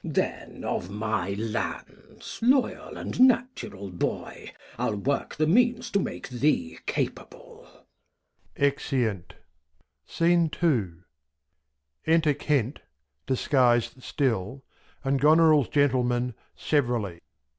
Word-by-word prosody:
Then - - -3
of 90 - -3
my 105 -2 -2
Lands, 110 +2 -5
loyal 255 +3 +1
and - - -5
natural 245 - +2
Boy, 90 - -4 0.3
I'll 105 - 0
work 135 +8 -2
the 155 - +1
Means 240 +6 +2
to 200 - +2
make - - -4
thee 150 - 0
capable. - - -5 0.9
[Exeunt. 130 - -1 0.8
Enter 160 - +1 1.3
Kent 140 -3 -1 0.5
{disguis'd 125 -2 +2
still) 130 -2 -2 0.4
and 135 -1 0
Goneril's 155 -2 +5
Gentleman, 125 -3 +1 0.2
severally. 120 - -1
135 Hz, 85 wpm, -26 LUFS, 110-165 Hz, 1.3 s, Goneril's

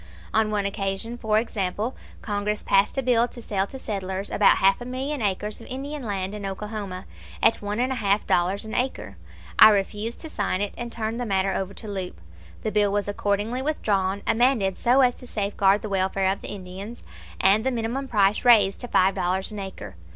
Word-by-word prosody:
On 220 -1 +3
one 205 -1 0
occasion, 200 +3 -2
for 220 -3 +1
example, 215 +1 -2 0.3
Congress 210 0 -2
passed 200 +7 +2
a 270 - +1
bill 240 -1 +3
to 245 - -12
sell 200 -4 -1
to 265 - -8
settlers 195 -4 -4
about 205 - +5
half 195 +4 +3
a - - -5
million 265 +3 -3
acres 210 +2 -2
of - - -12
Indian 280 +3 -5
land 200 -4 -3
in 210 -1 -6
Oklahoma 195 -1 -5 0.4
at - - +4
one 205 +2 -3
and 255 +2 +1
a - - 0
half 200 0 +2
dollars 185 +4 +1
an 220 - -7
acre. 250 - -2 0.4
I 215 - +11
refused 210 +2 -1
to 320 - -7
sign 195 -3 -1
it, 205 0 -2
and 240 0 -6
turned 225 0 -3
the 245 - -2
matter 195 -1 +1
over 195 0 -3
to 220 - -8
Leupp. 190 -3 -4 0.5
The 215 - -1
bill 210 -1 +2
was 205 0 0
accordingly 205 +4 -1
withdrawn, 200 -9 0
amended 225 -5 +2
so 250 +3 +3
as 250 -1 +4
to 250 - -12
safeguard 200 -2 +1
the - - -3
welfare 190 0 +1
of 195 - -4
the - - -7
Indians, 195 +3 -8 0.4
and 200 +3 +4
the 265 - +1
minimum 245 +3 -2
price 205 -3 +2
raised 215 -6 +5
to 245 - -5
five 190 -4 +3
dollars 185 +4 -1
an 210 - -6
acre. 105 - -8
205 Hz, 200 wpm, -25 LUFS, 195-235 Hz, 0.5 s, I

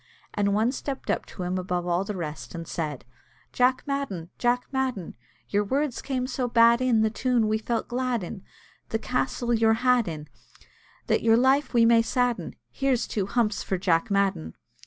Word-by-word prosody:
and 200 -1 +1
one 220 +4 +2
stepped 270 0 -4
up - - -2
to 185 - -7
him 180 +1 -1
above 180 -1 -2
all 175 +1 +1
the 205 +1 -5
rest, 155 -1 -6
and 165 -1 -6
said 150 -5 -4 0.5
"Jack 255 +1 +2
Madden! 240 - -3
Jack 245 0 +1
Madden! 260 -9 -2 0.3
Your 205 0 +1
words 270 +4 -1
came 260 -2 -2
so 255 -1 -2
bad 235 0 +5
in 245 -4 +3
The 220 0 +2
tune 240 -1 +1
we 215 0 +1
felt 230 +1 -2
glad 245 -3 -1
in; 190 +3 -7 0.5
This 225 - -2
castle 250 -1 -1
you're 225 -1 +4
had 250 -4 +4
in, 155 -2 -6 0.8
That - - +1
your 225 0 +4
life 265 +2 +2
we 230 -1 +6
may 230 0 +6
sadden; 245 0 -1 0.2
Here's 270 -3 0
two 200 -3 -2
humps 215 -1 0
for 190 - -2
Jack 170 -3 +1
Madden!" 195 - 0
230 Hz, 180 wpm, -26 LUFS, 190-250 Hz, 0.8 s, we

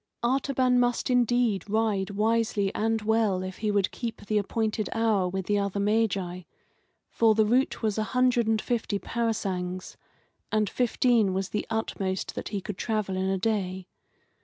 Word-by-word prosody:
Artaban 255 0 +2
must 245 +1 +1
indeed 240 -4 +2
ride 210 -2 +1
wisely 215 -1 +1
and 225 0 0
well 215 -4 +1
if 185 0 -6
he 215 - -1
would 200 -2 +1
keep 230 -4 -6
the 210 0 +1
appointed 215 +1 -1
hour 215 -5 +1
with 190 0 -3
the 205 +1 +1
other 200 0 -2
Magi; 200 -4 0 0.7
for 225 -2 +4
the 220 0 +4
route 245 +3 +1
was 215 -1 0
a - - +1
hundred 250 -2 +3
and 220 -1 +2
fifty 225 -4 -1
parasangs, 190 -6 -3 0.5
and 215 -1 +2
fifteen 240 -4 +2
was 190 0 -2
the 210 - -3
utmost 195 -4 -2
that - - -5
he 205 -2 -3
could 190 0 -6
travel 215 -4 -1
in 190 0 0
a 195 - +1
day. 190 -3 -1
215 Hz, 160 wpm, -27 LUFS, 195-230 Hz, 0.7 s, for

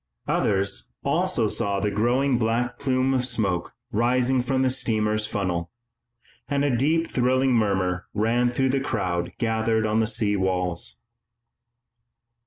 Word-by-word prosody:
Others 95 0 0
also 155 -5 +1
saw 100 -2 -1
the 105 +1 -1
growing 120 +5 +1
black 120 +2 -1
plume 130 -1 +1
of 130 -1 +1
smoke 100 -8 -1 0.2
rising 125 +3 +2
from 130 +1 0
the 130 - +2
steamer's 110 -4 0
funnel, 90 -5 -2 0.8
and 140 0 +1
a 135 -4 +1
deep 160 +7 +2
thrilling 130 -1 +1
murmur 95 -5 0
ran 115 +3 +2
through 130 +2 0
the 135 +1 +1
crowd 90 -9 -2
gathered 110 -1 0
on 110 +1 +1
the 110 - +2
sea 105 -3 +1
walls. 95 +3 -1
115 Hz, 135 wpm, -24 LUFS, 100-130 Hz, 0.8 s, rising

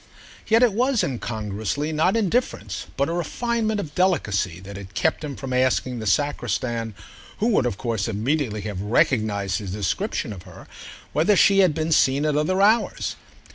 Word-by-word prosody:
Yet 225 +2 +5
it 235 -5 +4
was, 250 +2 +2
incongruously, 110 +3 -3
not 160 +7 +2
indifference, 200 - -1
but 140 +1 +2
a 165 - -2
refinement 220 +5 -1
of 155 -7 -5
delicacy 100 - +1
that 100 +1 -9
had 95 -1 -10
kept 160 0 0
him 145 -2 -5
from 135 -2 -5
asking 125 -1 +1
the 110 - -4
sacristan, 115 -2 -1 0.4
who 225 - +1
would 165 - +2
of 100 - -3
course 115 -4 -2
immediately 115 +1 -1
have 100 -2 -5
recognised 105 - +1
his 100 -3 -6
description 105 - -2
of 95 - -10
her, 90 -2 -13 0.5
whether 170 +7 +3
she 195 +1 +5
had 180 -6 +4
been 160 0 -1
seen 140 -1 +3
at 150 -1 +1
other 185 +6 +2
hours. 220 +3 +2
135 Hz, 170 wpm, -23 LUFS, -, 0.5 s, Yet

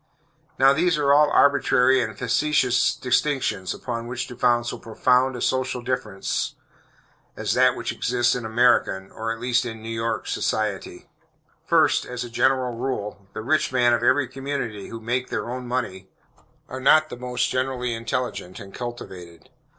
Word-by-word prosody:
Now 135 +1 +6
these 170 +2 +2
are 140 -1 +3
all 150 +1 +5
arbitrary 130 -2 +4
and 110 -3 -4
factitious 130 -1 +2
distinctions 125 -7 0
upon 115 -1 -5
which 125 +1 -3
to 125 - -8
found 120 -1 +2
so - - -4
profound 125 +3 +1
a 120 - -6
social 130 -1 -1
difference 120 -6 -2 0.8
as - - -1
that - - +4
which - - -3
exists 120 0 +1
in 125 - -3
American, 110 -4 +2
or, 115 0 -4
at 115 - -5
least 125 0 +1
in 115 -2 -6
New 115 - -6
York, 115 0 -2
society. 100 -4 -2 0.6
First, - - +3
as 125 0 -4
a 120 - -8
general 130 0 +1
rule, 105 -5 -4
the - - -6
rich 155 +4 +1
men 120 -2 +3
of 120 - +1
every 130 +2 +3
community, 130 -5 -5
who 115 - -7
make 120 +3 -2
their - - -3
own 125 0 -5
money, 95 -7 -3 0.6
are 130 +1 -7
not 155 +3 +5
the - - -6
most 125 0 -2
generally 130 -1 -1
intelligent 115 -5 -4
and 95 -1 -11
cultivated. 90 -9 -8
125 Hz, 165 wpm, -23 LUFS, 115-130 Hz, 0.8 s, Now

